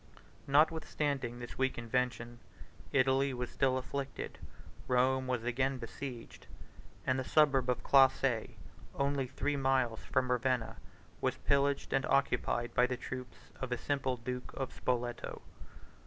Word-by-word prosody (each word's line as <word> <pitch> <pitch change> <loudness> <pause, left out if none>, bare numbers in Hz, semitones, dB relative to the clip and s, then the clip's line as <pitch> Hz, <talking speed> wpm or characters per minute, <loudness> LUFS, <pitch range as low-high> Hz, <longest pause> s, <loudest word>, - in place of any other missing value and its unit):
Notwithstanding 145 -4 +1
this 120 +1 -8
weak 130 0 +1
invention, 120 0 -2 0.5
Italy 135 0 +3
was 125 0 -4
still 130 -1 +2
afflicted, 135 +1 -5 0.5
Rome 130 +1 +2
was 125 -3 -1
again 130 +3 0
besieged, 120 0 -8 0.6
and 130 0 +1
the - - -1
suburb 135 -3 +3
of 125 -1 0
Classe, 135 -3 +4 0.5
only 140 -1 0
three 140 +2 -1
miles 130 -4 +1
from 130 -1 0
Ravenna, 125 -2 0 0.4
was - - +1
pillaged 140 0 +1
and 135 - +1
occupied 125 -3 +1
by 125 - +4
the 125 0 -2
troops 125 -2 -8
of 130 -1 -4
a 125 - +1
simple 130 -1 -1
duke 125 +1 -5
of 135 -1 -4
Spoleto. 120 -1 -2
130 Hz, 130 wpm, -33 LUFS, 125-135 Hz, 0.6 s, Classe